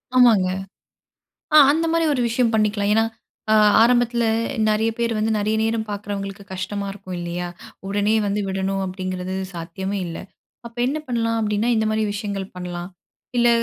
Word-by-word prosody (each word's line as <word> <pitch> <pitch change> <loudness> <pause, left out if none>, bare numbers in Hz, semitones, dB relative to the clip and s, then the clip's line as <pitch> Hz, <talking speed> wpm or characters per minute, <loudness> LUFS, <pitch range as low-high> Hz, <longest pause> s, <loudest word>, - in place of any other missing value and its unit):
ஆமாங்க. 225 -7 +5 1.1
ஆ - - +8
அந்த 325 +2 +1
மாரி 330 0 +2
ஒரு 255 - 0
விஷயம் 235 0 +1
பண்ணிக்கலாம். 210 -1 +1
ஏன்னா 225 - +4 0.5
அ - - +6 0.3
ஆரம்பத்துல 240 0 +3 0.4
நெறைய 220 +1 +2
பேர் 235 -1 0
வந்து 220 +1 +1
நெறைய 210 +1 0
நேரம் 225 0 0
பார்க்குறவங்களுக்கு 200 -1 -5
கஷ்டமா 200 +2 -3
இருக்கும் 185 -2 -8
இல்லையா? 175 +1 -4 0.4
உடனே 205 +2 +1
வந்து 200 +1 0
விடணும் 195 0 -1
அப்டிங்கிறது 185 0 -4 0.2
சாத்தியமே 190 +4 -4
இல்ல. 165 - -6 0.5
அப்ப 235 +1 -12
என்ன 295 +4 -1
பண்ணலாம் 230 -2 0
அப்டின்னா, 210 +2 0
இந்த 220 0 +1
மாரி 215 0 0
விஷயங்கள் 200 -2 -4
பண்ணலாம். 175 0 -6 0.5
இல்ல 240 0 +4
205 Hz, 150 wpm, -22 LUFS, 190-230 Hz, 1.1 s, ஆ